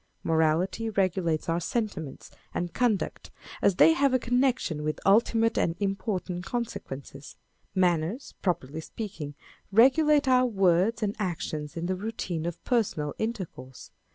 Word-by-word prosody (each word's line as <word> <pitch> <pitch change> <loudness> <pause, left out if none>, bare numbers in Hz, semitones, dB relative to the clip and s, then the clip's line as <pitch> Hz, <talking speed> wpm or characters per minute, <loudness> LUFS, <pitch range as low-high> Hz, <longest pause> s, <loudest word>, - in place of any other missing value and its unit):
Morality 165 +7 +1
regulates 185 -5 0
our 165 +1 +1
sentiments 175 - -4 0.2
and 175 -1 -2
conduct 235 -5 0 0.3
as 200 - +3
they 325 - +7
have 280 -4 +2
a - - +6
connection 245 - 0
with 155 0 -2
ultimate 225 +2 +3
and 165 - +1
important 195 -3 -2
consequences: 150 - -6 0.4
â€" 190 - +2
Manners, 175 - 0
properly 160 -4 -2
speaking, 160 -7 -7 0.4
regulate 285 +6 +5
our 255 -1 +5
words 195 +1 +2
and 205 0 -1
actions 160 -5 -3
in 165 - -2
the 185 +1 0
routine 185 -5 -4
of 170 - -6
personal 195 - 0
intercourse. 185 - -5
190 Hz, 130 wpm, -27 LUFS, 165-230 Hz, 0.4 s, they